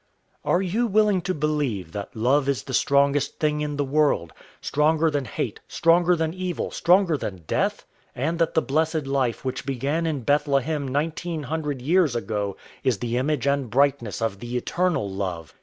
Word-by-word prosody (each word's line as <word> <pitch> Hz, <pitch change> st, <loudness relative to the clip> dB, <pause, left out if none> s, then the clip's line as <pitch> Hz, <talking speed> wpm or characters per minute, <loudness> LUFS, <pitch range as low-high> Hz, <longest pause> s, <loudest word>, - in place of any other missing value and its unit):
Are 180 Hz, -, +2 dB
you 215 Hz, +7 st, 0 dB
willing 210 Hz, -2 st, +3 dB
to 185 Hz, +2 st, -1 dB
believe 145 Hz, -, -1 dB
that 100 Hz, +4 st, -6 dB
love 135 Hz, +5 st, +2 dB
is 140 Hz, -, 0 dB
the 130 Hz, -, -7 dB
strongest 140 Hz, +2 st, +2 dB
thing 150 Hz, -1 st, +1 dB
in 150 Hz, -1 st, -2 dB
the 145 Hz, -, +1 dB
world 140 Hz, -, +1 dB, 0.3 s
stronger 155 Hz, +2 st, +2 dB
than 145 Hz, -2 st, -1 dB
hate, 110 Hz, -, -4 dB
stronger 175 Hz, +1 st, +3 dB
than 160 Hz, -1 st, -1 dB
evil, 185 Hz, -1 st, -3 dB
stronger 175 Hz, -2 st, +3 dB
than 95 Hz, -9 st, -6 dB
death -, -, -1 dB, 0.3 s
and 160 Hz, +7 st, -1 dB
that 165 Hz, -1 st, +1 dB
the 160 Hz, -, +3 dB
blessed 155 Hz, +1 st, 0 dB
life 135 Hz, -3 st, -1 dB
which 130 Hz, 0 st, -3 dB
began 140 Hz, +5 st, -1 dB
in 150 Hz, -4 st, -2 dB
Bethlehem 145 Hz, +2 st, +1 dB
nineteen 155 Hz, +3 st, -2 dB
hundred 145 Hz, -3 st, -3 dB
years 160 Hz, -3 st, +3 dB
ago 105 Hz, -4 st, -2 dB, 0.3 s
is 125 Hz, -5 st, +2 dB
the 120 Hz, +2 st, -3 dB
image 140 Hz, +1 st, 0 dB
and 140 Hz, -3 st, +1 dB
brightness 130 Hz, -3 st, +1 dB
of 100 Hz, -4 st, -2 dB
the 120 Hz, +1 st, -4 dB
Eternal 175 Hz, -, 0 dB
Love? 95 Hz, -5 st, -4 dB
145 Hz, 175 wpm, -24 LUFS, 125-160 Hz, 0.3 s, willing